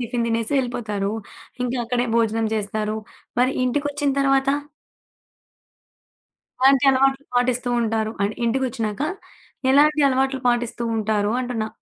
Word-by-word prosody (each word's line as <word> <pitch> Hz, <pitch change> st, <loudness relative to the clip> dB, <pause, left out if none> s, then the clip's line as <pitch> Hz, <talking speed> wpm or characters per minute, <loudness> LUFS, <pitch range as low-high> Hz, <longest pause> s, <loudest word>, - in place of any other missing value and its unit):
Tiffin 240 Hz, 0 st, -2 dB
తినేసి 230 Hz, +3 st, -1 dB
వెళ్ళిపోతారు. 210 Hz, -5 st, -2 dB, 0.5 s
ఇంకా 250 Hz, +1 st, -2 dB
అక్కడే 245 Hz, +1 st, 0 dB
భోజనం 225 Hz, -1 st, +1 dB
చేస్తారు. 215 Hz, +1 st, -2 dB, 0.4 s
మరి 255 Hz, +2 st, +3 dB
ఇంటికొచ్చిన 285 Hz, +2 st, 0 dB
తర్వాత 275 Hz, 0 st, +2 dB, 2.1 s
ఎలాంటి 270 Hz, +1 st, +5 dB
అలవాట్లు 270 Hz, +1 st, +2 dB
పాటిస్తూ 245 Hz, 0 st, +1 dB
ఉంటారు? 220 Hz, -1 st, -1 dB
అంటే, 205 Hz, +2 st, 0 dB
ఇంటికొచ్చినాక 235 Hz, -1 st, -1 dB, 0.7 s
ఎలాంటి 300 Hz, +2 st, +5 dB
అలవాట్లు 265 Hz, 0 st, 0 dB
పాటిస్తూ 240 Hz, 0 st, -1 dB
ఉంటారు 210 Hz, -1 st, 0 dB
అంటున్నా? 235 Hz, -3 st, -3 dB
245 Hz, 105 wpm, -22 LUFS, 220-265 Hz, 2.1 s, ఎలాంటి